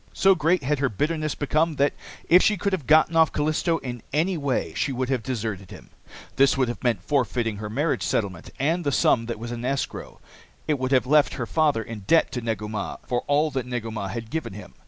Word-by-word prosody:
So 195 0 +5
great 165 -1 +1
had 145 +2 0
her 135 -1 +1
bitterness 155 - -1
become 155 +2 0
that, 140 0 +2 0.3
if 180 +2 +7
she 210 - +3
could 200 +2 -1
have 160 -9 -3
gotten 155 +1 +5
off 160 -2 +5
Callisto 155 +3 0
in 120 -5 -6
any 170 +6 +1
way, 140 -5 -1
she 145 - -1
would 130 0 -2
have 130 -3 0
deserted 110 -6 -4
him. - - -13 0.5
This 135 0 +4
would 130 -3 +1
have 120 - -6
meant 120 -4 0
forfeiting 120 -5 0
her 105 0 -5
marriage 140 0 0
settlement 95 -1 -2
and 165 +6 0
the 145 - 0
sum 115 -3 +2
that 115 - -4
was 115 +2 -6
in 120 0 -5
escrow. 135 +2 -3 0.5
It 150 -3 0
would 130 +1 -2
also - - +5
have - - -18
left 150 +2 +3
her 125 - -3
father 150 -5 +1
in 115 0 -7
debt 165 - +4
to 125 - -3
Negu 110 -2 -3
Mah 105 -2 -4
for 120 -1 -1
all 150 +2 +2
that 130 -2 -3
Negu 120 -2 -4
Mah 105 -3 -4
had 110 +3 -6
given 160 -10 -3
him. 105 - -11
135 Hz, 230 wpm, -24 LUFS, 115-155 Hz, 0.5 s, if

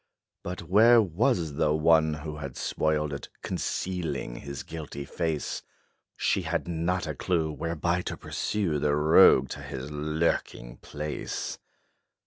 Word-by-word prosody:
But 90 +1 -5
where 115 +5 +6
was 85 -5 +1
the 75 -1 +2
one, 80 0 +4
who 75 0 -6
had 70 -4 -7
spoiled 75 -1 0
it, 70 - -6
Concealing 90 -9 -3
his 70 -1 -6
guilty 75 -3 -7
face? 80 0 -2 0.6
She - - +1
had - - -2
not 85 +2 -1
a 80 - -3
clue 80 +1 0
whereby 85 +3 -1
to - - -5
pursue 90 -8 -1
The 75 0 +2
rogue 75 -3 +6
to - - -6
his 65 +3 -6
lurking 75 -5 -1
place. 75 0 -5
80 Hz, 130 wpm, -28 LUFS, 75-85 Hz, 0.6 s, where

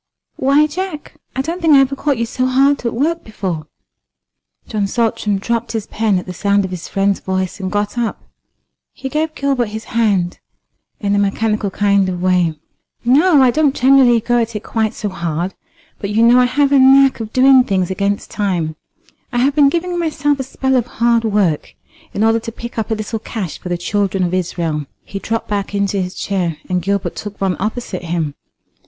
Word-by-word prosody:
"Why, 280 +3 +4
Jack, 340 0 -5 0.2
I 265 - 0
don't 335 +5 -4
think 320 -3 +5
I - - +8
ever 270 0 +2
caught 280 -1 0
you 235 - 0
so 255 +2 -1
hard 270 +2 +3
at 235 - -2
work 325 +7 0
before." 185 -8 -4 1.0
John 210 -3 -1
Saltram 215 -2 0
dropped 235 +4 -2
his 220 -2 -2
pen 215 -3 0
at 180 - -4
the 185 - -6
sound 200 +2 +1
of 185 - -6
his 180 -2 -6
friend's 195 0 0
voice 185 0 -3
and 185 -1 -4
got 205 +3 -1
up. 235 -2 -2 0.7
He 265 - -6
gave 310 +2 -1
Gilbert 275 -4 0
his 220 +1 -6
hand 200 -6 +1 0.6
in 200 -1 0
a 205 - +2
mechanical 210 +1 0
kind 200 -1 +2
of 180 -1 -3
way. 180 -3 +1 0.5
"No, 290 +3 +5
I 250 - +5
don't 295 0 +2
generally 255 -2 +5
go 240 +2 +1
at 230 0 -3
it 210 - -4
quite 220 -2 -1
so 210 - -3
hard; 170 0 -3 0.5
but 200 - -4
you 220 +2 +2
know 240 +2 +6
I 250 - +5
have 280 +3 +1
a 280 - +5
knack 270 0 +6
of 220 -1 -5
doing 260 +1 +6
things 190 -5 -1
against 200 +1 -2
time. 175 -7 -1 0.5
I 245 - -2
have 270 +4 +3
been 290 -1 +5
giving 350 +3 -2
myself 290 -3 0
a - - -1
spell 265 0 -1
of 245 -1 0
hard 235 -1 +3
work 200 -8 0 0.4
in 205 - +1
order 225 +1 +3
to 230 - -7
pick 235 0 -7
up 220 - -3
a 220 - +1
little 215 +1 -4
cash 210 -6 -5
for 180 - -7
the 175 - -1
children 195 +1 -1
of 175 0 -1
Israel." 165 -5 -2 0.2
He 195 - -6
dropped 225 +2 -3
back 205 -1 -2
into 200 -1 0
his 180 0 -5
chair, 180 -5 -2
and 180 -1 0
Gilbert 200 +2 -1
took 210 -1 -7
one 190 -2 0
opposite 210 -3 -4
him. 165 -3 -2
220 Hz, 200 wpm, -17 LUFS, 195-260 Hz, 1.0 s, I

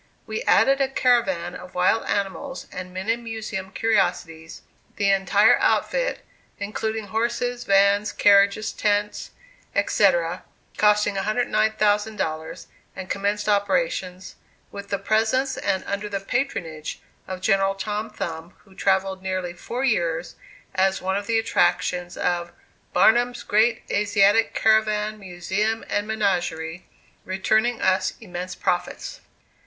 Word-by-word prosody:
We 455 - -4
added 275 +1 +4
a 270 - +3
caravan 200 -10 +1
of 180 0 -11
wild 180 +5 +2
animals 205 +8 -3
and 185 0 -7
many 190 +5 -1
museum 220 -4 -6
curiosities, 165 -7 -1 0.3
the 200 -1 +2
entire 200 +3 +4
outfit, - - 0 0.3
including 215 +1 -4
horses, 240 +3 -1
vans, 200 +1 +3
carriages, 200 +1 +4
tent, 210 0 -1 0.5
etc., - - +2 0.3
costing 210 -1 +3
$109,000, 210 -6 0 0.3
and 185 0 -7
commenced 205 +1 -1
operations, 200 - -1 0.3
with 200 0 -8
the 200 - 0
presence 230 +6 +1
and 190 - -1
under 200 +1 -3
the 200 -1 -2
"patronage" 190 - -3 0.3
of 185 -1 -5
General 195 0 +2
Tom 210 +2 -3
Thumb, 170 -4 -6
who 195 - -19
travelled 190 0 0
nearly 185 -2 -3
four 240 +8 -5
years 170 -9 0 0.4
as 190 +1 +2
one 190 +1 -1
of 200 0 -3
the 230 - +2
attractions 180 -4 0
of 175 -1 -1 0.4
"Barnum's 245 +2 +3
Great 220 +2 +2
Asiatic 205 +1 +3
Caravan, 215 -1 +2
Museum 195 +4 -2
and 205 0 0
Menagerie," 175 -6 -2 0.4
returning 220 +5 0
us 185 0 +2
immense 180 -3 -6
profits. 180 -2 -3
200 Hz, 115 wpm, -23 LUFS, 185-220 Hz, 0.5 s, added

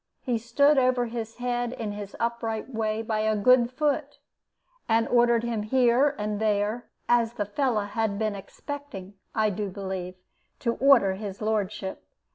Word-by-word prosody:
He 245 -4 0
stood 280 +6 +3
over 255 -1 +2
his 230 -1 -5
head 245 0 -2
in 220 -4 -4
his 205 -1 -7
upright 235 +1 -2
way 220 0 -1
by 220 -1 -1
a 215 0 +1
good 240 +3 +4
foot, 290 +1 -1 0.7
and 225 0 +3
ordered 235 -1 +3
him 235 -2 -1
here 255 +5 +3
and 210 0 -2
there, 215 +2 0 0.2
as 235 -1 +3
the 210 -3 -2
fellow 220 0 0
had 210 -1 -1
been 215 0 0
expecting, 205 -1 -8 0.2
I 215 -1 +2
do 205 +1 -3
believe, 190 -2 -5 0.5
to 235 -2 +1
order 250 -8 +5
his 195 0 -6
lordship. 210 -3 -2
225 Hz, 155 wpm, -26 LUFS, 210-245 Hz, 0.7 s, order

